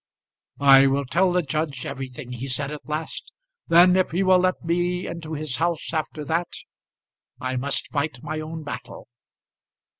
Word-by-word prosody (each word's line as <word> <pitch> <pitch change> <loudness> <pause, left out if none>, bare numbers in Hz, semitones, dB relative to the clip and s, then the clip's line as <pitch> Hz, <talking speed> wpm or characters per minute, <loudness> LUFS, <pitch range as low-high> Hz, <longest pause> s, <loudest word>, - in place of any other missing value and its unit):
"I 135 0 +8
will 140 +1 +1
tell 180 +8 +2
the 180 0 +2
judge 145 -2 -3
everything," 130 -2 -6
he 125 +2 -5
said 140 +2 -1
at 150 0 -9
last. 155 +1 -4 0.4
"Then, 175 +2 +7
if 185 -1 +2
he 180 +4 0
will 185 -1 +5
let 185 0 0
me 175 +2 0
into 160 -2 -6
his 150 -3 -3
house 170 0 -1
after 155 -1 -3
that, 170 +3 -1 0.9
I 130 0 -3
must 135 +2 -2
fight 140 -3 -2
my 155 - -3
own 155 +1 -6
battle." 125 -4 -8
155 Hz, 160 wpm, -24 LUFS, 135-170 Hz, 0.9 s, I